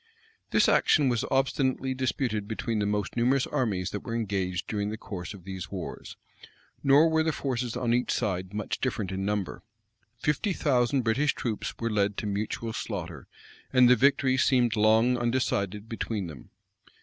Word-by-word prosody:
[] 450 0 -37
This - - +4
action 145 -4 +4
was 120 -3 0
obstinately 135 -1 +1
disputed 125 -5 -1
between 110 0 -2
the 100 - 0
most 105 -1 -2
numerous 125 +3 +2
armies 100 -8 -1
that 105 - -3
were 115 +2 -5
engaged 95 -4 -2
during 105 -1 -2
the 110 - -4
course 95 -2 -7
of 95 - -13
these 95 0 -6
wars; 95 -4 -7 0.6
nor 145 +3 +6
were 160 0 +2
the 160 0 +1
forces 125 -5 -2
on 120 -2 0
each 125 +1 +1
side 95 -5 -1
much 105 -1 -3
different 110 -7 -2
in 95 0 -3
number. 105 -2 -2 0.6
Fifty 150 - 0
thousand 130 -4 +1
British 130 +6 +1
troops 110 -4 -3
were 115 -1 -2
led 100 -1 +1
to - - -3
mutual 110 +3 -3
slaughter; 85 - -5 0.4
and 130 -2 +6
the 125 - +7
victory 130 -1 +3
seemed 125 -4 +3
long 110 +3 +4
undecided 110 -4 -1
between 110 -3 -3
them. 75 -7 -10
115 Hz, 170 wpm, -28 LUFS, 100-130 Hz, 0.6 s, the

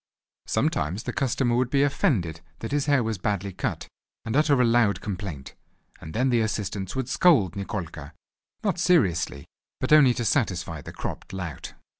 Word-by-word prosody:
_ - - -13
Sometimes 90 +9 0
the - - -4
customer 125 -2 +1
would 125 0 +1
be 140 +1 +3
offended 105 - 0 0.2
that 115 - -6
his 145 0 0
hair 140 -4 +3
was 110 -3 -2
badly 100 -1 -2
cut - - -3 0.4
and 110 +1 -2
utter 150 -2 +4
a 125 - +5
loud 115 -3 +3
complaint, 90 -9 -6 0.5
and 80 - -9
then 130 +2 +2
the 120 -1 +3
assistants 100 -3 -3
would 130 -2 -2
scold 140 - +4
Nikolka, 90 -7 -5 0.5
not 195 -4 0
seriously, 90 - +2 0.3
but - - +1
only 135 -5 +7
to 120 - -2
satisfy 90 - 0
the - - -9
cropped - - -6
lout. 90 -5 -6
110 Hz, 170 wpm, -25 LUFS, 90-135 Hz, 0.5 s, only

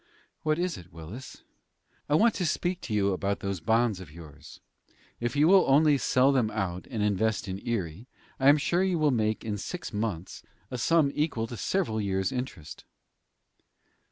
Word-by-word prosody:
"What 155 0 +1
is 175 -2 -2
it, 90 0 -15
Willis?" 90 +11 -10 0.7
"I 145 - +3
want 225 +6 +4
to 180 - -2
speak 175 +3 -1
to 110 - -5
you 100 -1 +2
about 100 +2 -2
those 100 -2 -3
bonds 110 +3 +1
of 95 -5 -10
yours. 75 -1 -13 0.6
If 120 +4 -2
you 150 +2 +4
will 190 +1 +7
only 145 +1 +5
sell 130 +3 +3
them 125 -6 +2
out, 90 -5 -3
and 110 -2 -2
invest 105 +1 0
in 95 +1 -5
Erie, 100 -1 -3 0.3
I 135 +1 +5
am 145 - +7
sure 170 +4 +1
you 185 -2 +1
will 155 -2 +3
make 110 -3 0
in 105 -2 -3
six 175 - -6
months 105 -5 -3 0.3
a 125 - -4
sum 155 +2 +3
equal 150 -7 -1
to 120 - -7
several 110 - -1
years 95 -1 -1
interest." 125 - -6
115 Hz, 180 wpm, -28 LUFS, 95-145 Hz, 0.7 s, will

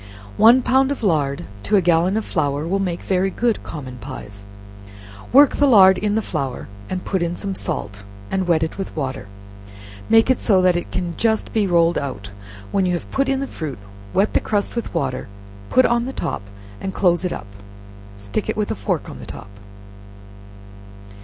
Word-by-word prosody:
One 240 +4 +7
pound 265 +2 +3
of 280 -4 -4
lard 145 -8 0 0.2
to 210 - +1
a 195 - +5
gallon 175 +4 +3
of 220 - -2
flour 145 -1 -1
will 195 +3 0
make 180 -3 -2
very 190 0 +1
good 230 +3 0
common 130 -5 -8
pies. 100 -7 -9 0.8
Work 280 +2 +6
the 290 - +4
lard 190 -6 +7
in 210 0 0
the 220 - 0
flour, 140 -8 -4 0.4
put 190 -2 -1
in 170 0 -1
some 195 +1 -4
salt, 100 - -5 0.3
and 190 -1 0
wet 165 -2 +3
it 160 - -4
with 195 - -5
water, 135 -8 -4 0.8
make 225 +3 +5
it 260 - +1
so 195 -4 +4
that 180 -1 +4
it 175 - -3
can 175 -2 -2
just 220 -1 0
be 215 -3 +2
rolled 170 -1 +3
out, 105 -8 -6 0.4
when 190 -2 +1
you 180 - +1
have 170 - -7
put 275 0 +1
in 270 0 0
the - - -1
fruit, 155 - -6 0.3
wet 200 +2 +1
the - - +4
crust 205 +1 -1
with 235 - -3
water, 135 -6 -2 0.4
put 255 - +5
on 235 0 +2
the 265 - -5
top - - -3 0.4
and 190 - -5
close 175 -2 +2
it 180 - -1
up, - - -5 0.7
stick 100 -1 -4
it - - -1
with - - -1
a - - -1
fork - - -2
on - - -9
the - - -10
top. - - -9
185 Hz, 190 wpm, -21 LUFS, 150-220 Hz, 0.8 s, One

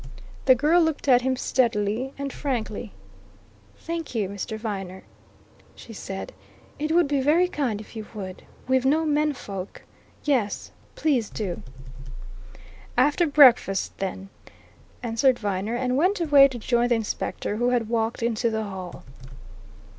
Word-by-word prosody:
The 260 - +7
girl 305 +7 +4
looked 320 -3 -1
at 250 -2 +6
him 260 +1 0
steadily 235 -1 0
and 280 -1 -4
frankly. 235 -5 -3 0.9
"Thank 330 -5 -5
you, 205 -4 0
Mr. 200 +2 -5
Viner," 195 -4 -5 0.7
she 230 - -11
said. 195 -2 -6 0.5
"It 305 +1 -1
would 340 -1 +4
be 280 -1 +1
very 320 +6 +4
kind 265 - -2
if 215 - -12
you 220 -1 -6
would. 190 -3 -7 0.3
We've 260 0 +2
no 305 +4 +2
men 300 0 +1
folk 195 -7 -8 0.4
yes, 245 -9 0 0.2
please 265 -9 +1
do." 195 -6 -4 1.4
"After 290 +7 +3
breakfast, 255 -9 +5
then," 195 0 -4 0.7
answered 245 +2 +2
Viner, 205 +2 -2
and 250 +1 0
went 365 +7 +2
away 290 -4 +7
to 260 -3 -7
join 240 +1 +1
the 240 - +3
Inspector, 215 -1 -3
who 240 +2 +2
had 240 -3 +1
walked 230 0 -1
into 235 0 +1
the 220 -1 -2
hall. 190 -3 -7
245 Hz, 140 wpm, -25 LUFS, 210-285 Hz, 1.4 s, The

